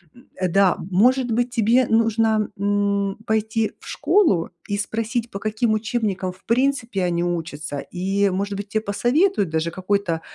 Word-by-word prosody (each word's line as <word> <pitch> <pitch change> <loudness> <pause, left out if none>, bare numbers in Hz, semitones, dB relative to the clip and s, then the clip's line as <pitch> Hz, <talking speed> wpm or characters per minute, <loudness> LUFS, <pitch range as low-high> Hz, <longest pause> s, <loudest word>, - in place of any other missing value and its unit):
М, 245 +2 -18 0.2
э, 185 - +2
да, 195 +1 +3
может 245 +6 +3
быть, 240 +2 +1
тебе 240 +1 +3
нужно, 225 -1 +2
м, 200 0 0
пойти 220 0 0
в - - -15
школу 205 - +2 0.2
и 205 - -1
спросить, 225 +3 -2
по 195 - -5
каким 215 +2 0
учебникам 215 -4 -1
в 185 - -23
принципе 245 -4 0
они 170 -1 0
учатся, 160 -4 -3 0.2
и, 195 +2 +1
может 200 +2 -2
быть, 200 0 -5
те 215 - 0
посоветуют 240 - +1
даже 160 +1 -1
какой-то 185 -2 -1
205 Hz, 155 wpm, -22 LUFS, 190-230 Hz, 0.2 s, да